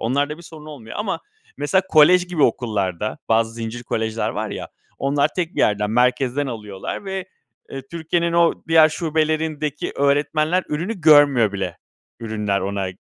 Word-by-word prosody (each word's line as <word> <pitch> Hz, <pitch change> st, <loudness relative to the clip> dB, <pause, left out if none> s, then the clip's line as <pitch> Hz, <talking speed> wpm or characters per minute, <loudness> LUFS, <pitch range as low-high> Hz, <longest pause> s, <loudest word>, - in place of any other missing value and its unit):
Onlar 140 Hz, +5 st, 0 dB
da 150 Hz, -, -5 dB
bir 170 Hz, -, -12 dB
sorun 155 Hz, -2 st, -12 dB
olmuyor 135 Hz, -8 st, -9 dB
ama 210 Hz, -2 st, -2 dB, 0.4 s
mesela 165 Hz, +7 st, +1 dB
kolej 180 Hz, +3 st, +6 dB
gibi 175 Hz, -5 st, -1 dB
okullarda 105 Hz, -5 st, -1 dB
bazı 115 Hz, 0 st, +2 dB
zincir 115 Hz, +1 st, -6 dB
kolejler 110 Hz, -1 st, -2 dB
var 110 Hz, -1 st, -4 dB
ya, -, -, -6 dB, 0.3 s
onlar 140 Hz, +2 st, +1 dB
tek 175 Hz, -1 st, -2 dB
1 -, -, -1 dB
yerden 105 Hz, 0 st, +1 dB
merkezden 125 Hz, +3 st, +1 dB
alıyorlar 105 Hz, -, -6 dB
ve, 190 Hz, -1 st, -4 dB, 0.4 s
eee, 135 Hz, -1 st, -6 dB
Türkiye'nin 170 Hz, +1 st, -1 dB
o 170 Hz, 0 st, +4 dB
diğer 160 Hz, -1 st, +6 dB
şubelerindeki 155 Hz, -2 st, -1 dB
öğretmenler 150 Hz, +5 st, +1 dB
ürünü 180 Hz, +7 st, -3 dB
görmüyor 145 Hz, -8 st, +5 dB
bile 95 Hz, -1 st, -4 dB, 0.4 s
ürünler 105 Hz, -3 st, -2 dB
ona, 100 Hz, 0 st, -2 dB
145 Hz, 150 wpm, -21 LUFS, 110-160 Hz, 0.4 s, kolej